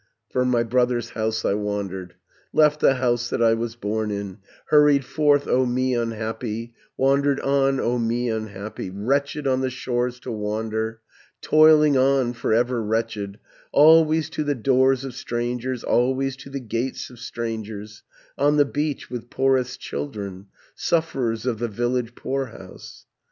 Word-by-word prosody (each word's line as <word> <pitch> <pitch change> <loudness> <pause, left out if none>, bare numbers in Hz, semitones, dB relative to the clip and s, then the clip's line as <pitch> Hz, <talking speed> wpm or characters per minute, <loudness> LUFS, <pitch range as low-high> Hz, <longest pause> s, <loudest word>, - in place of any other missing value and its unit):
820 - - -34
"From 125 - +2
my 120 -2 +2
brother's 120 0 +1
house 110 0 -2
I - - +2
wandered, 100 -3 -4 0.4
Left 150 -1 +4
the 135 - +4
house 120 -2 0
that - - -2
I 115 -1 +5
was 115 0 -3
born 110 -1 -2
in, 100 -1 -5 0.3
Hurried 150 -2 +5
forth, 145 +1 +2
O 130 - +3
me 130 +1 0
unhappy, 115 0 -3 0.2
Wandered 140 +1 +2
on, 135 -1 +2
O 120 +1 0
me 120 +1 0
unhappy, 110 -3 -5
Wretched 140 +9 -1
on 130 -1 +1
the 130 - 0
shores 125 -1 -2
to 125 - -6
wander, 110 +1 -3 0.4
Toiling 155 -2 +5
on, 130 -2 +2
for 120 - -3
ever 120 +1 +2
wretched, 110 -2 -2 0.3
Always 160 +1 +5
to 155 - -2
the 145 -1 0
doors 130 +2 +2
of 130 - -6
strangers, 120 +1 -3
Always 130 +2 +1
to 140 - -11
the 135 0 -4
gates 120 +2 -4
of 120 - -14
strangers, 110 -3 -6 0.4
On 145 +2 +3
the 145 - +5
beach, 145 -1 -3
with 120 -1 -6
poorest 130 -2 +1
children, 95 +6 -6 0.3
Sufferers 125 -9 -1
of 120 -4 -1
the 120 - -1
village 120 +2 -2
poorhouse. 135 -3 -6
120 Hz, 150 wpm, -23 LUFS, 110-135 Hz, 0.4 s, I